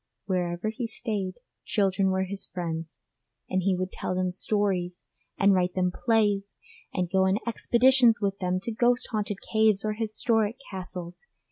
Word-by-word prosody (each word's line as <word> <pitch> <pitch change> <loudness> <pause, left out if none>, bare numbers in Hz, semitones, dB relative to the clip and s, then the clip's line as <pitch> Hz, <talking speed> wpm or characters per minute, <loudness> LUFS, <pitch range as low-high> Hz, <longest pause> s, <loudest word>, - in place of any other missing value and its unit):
Wherever 180 +1 -1
he 230 +2 -4
stayed, 210 -5 -3 0.3
children 195 -2 +1
were 190 0 +1
his 195 +1 -5
friends, 165 -3 -5 0.5
and 185 - 0
he 190 +1 +2
would 185 +1 -3
tell 185 - -3
them 185 0 0
stories 185 -2 -1 0.3
and 200 0 +5
write 180 -1 +1
them 180 -1 +1
plays 205 -2 +1 0.4
and 180 -2 -1
go 190 +2 +2
on 190 +2 +2
expeditions 240 0 +4
with 200 -1 -1
them 180 0 0
to 230 - -4
ghost 240 +2 +2
haunted 210 -2 -2 0.2
caves 220 -2 +3
or 215 - 0
historic 220 0 +1 0.2
castles. 180 -2 -6
195 Hz, 155 wpm, -27 LUFS, 185-220 Hz, 0.5 s, and